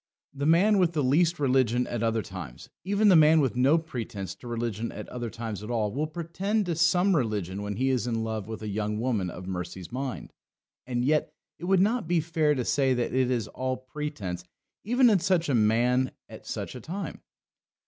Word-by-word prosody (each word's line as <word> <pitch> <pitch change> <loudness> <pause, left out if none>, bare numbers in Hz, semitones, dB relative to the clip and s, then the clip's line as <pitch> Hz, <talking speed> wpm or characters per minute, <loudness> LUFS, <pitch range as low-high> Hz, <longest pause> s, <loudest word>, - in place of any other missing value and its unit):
The 140 +1 -2
man 195 +6 +5
with 175 -2 +2
the 150 -3 0
least 165 +6 +3
religion 125 -3 +2
at 120 - -4
other 115 -1 +1
times, 90 -11 -9
even 205 +3 +2
the 185 - +7
man 155 0 +6
with 135 -4 +1
no 135 +6 +4
pretence 115 - -5
to 120 - -13
religion 115 -1 -3
at - - -8
other 120 -2 -4
times 115 -3 -5
at 105 - -7
all, 110 -4 0
will 145 +7 -1
pretend 180 +6 -2
to 170 -2 -1
some 175 +4 +3
religion 105 - -1
when 105 0 -4
he 130 +4 +1
is 125 -2 0
in 115 -2 -1
love 110 -2 -3
with 110 -1 -6
a - - -4
young 105 +1 -2
woman 110 -7 0
of 90 +1 -8
Mercy's 90 -1 -6
mind. 130 +1 -5 0.5
And 120 -1 -1
yet 150 +2 +2 0.3
it - - -6
would 190 0 +4
not 215 -1 +1
be 175 0 +2
fair 155 -2 +1
to 125 -3 -2
say 135 -2 +2
that 120 -1 -1
it 130 -1 +2
is 120 -4 0
all 130 0 -2
pretence 130 - -5 0.4
even 245 +4 +4
in 210 -5 +5
such 170 -2 +1
a - - +2
man 120 +3 +3 0.2
at - - -12
such - - -4
a 125 - -8
time. 190 - -6
130 Hz, 210 wpm, -27 LUFS, 110-165 Hz, 0.5 s, the